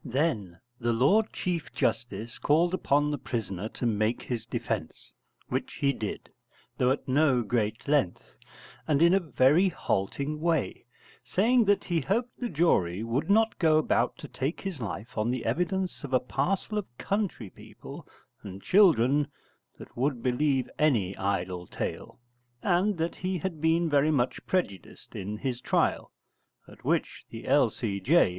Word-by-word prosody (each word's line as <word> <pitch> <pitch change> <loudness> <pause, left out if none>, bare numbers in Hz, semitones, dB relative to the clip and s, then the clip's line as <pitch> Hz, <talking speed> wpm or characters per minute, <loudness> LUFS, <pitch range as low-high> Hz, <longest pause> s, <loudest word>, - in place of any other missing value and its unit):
Then 115 - -1 0.2
the 120 -1 0
Lord 195 - +3
Chief 175 -4 -3
Justice 115 -1 -2
called 170 +4 +2
upon 145 -4 +2
the 145 - -3
prisoner 105 -4 -4
to 120 - -5
make 110 0 0
his 115 -3 -4
defence; - - -4 0.3
which - - -3
he 140 0 +1
did, 110 -5 -5 0.5
though 125 - +3
at 135 - -1
no 135 -2 +3
great 110 0 -1
length, 140 -11 0 0.5
and 150 -3 +2
in 170 +2 +5
a 195 - +5
very 155 +3 +3
halting 140 - -2
way, 165 -6 0 0.4
saying 225 - +3
that 205 0 +3
he 170 -3 0
hoped 230 - -1
the 245 - -2
jury 105 - +1
would 120 +9 -2
not 220 +2 +3
go 160 -3 +4
about 155 - +1
to - - -9
take 135 +5 -3
his 190 -7 -5
life 110 +2 -5
on 110 +2 +1
the 125 -1 -2
evidence 180 - -1
of 135 -2 -6
a 130 - +5
parcel 180 - -1
of 120 -12 -10
country 195 - -2
people - - -12 0.3
and 95 0 -9
children 150 - +4 0.5
that - - -13
would 130 -1 -1
believe 130 0 +1
any 110 -11 +2
idle 90 -2 -2
tale; - - -5 0.4
and 185 +3 +2
that 165 +1 -2
he 185 0 -2
had 170 -3 -4
been 165 +1 +2
very 145 0 +3
much 130 -5 0
prejudiced 170 - -3
in 105 +3 -4
his 125 +1 -3
trial; - - 0 0.6
at - - -16
which - - -1
the - - -9
L.C.J. 100 - +3
140 Hz, 155 wpm, -28 LUFS, 115-170 Hz, 0.6 s, in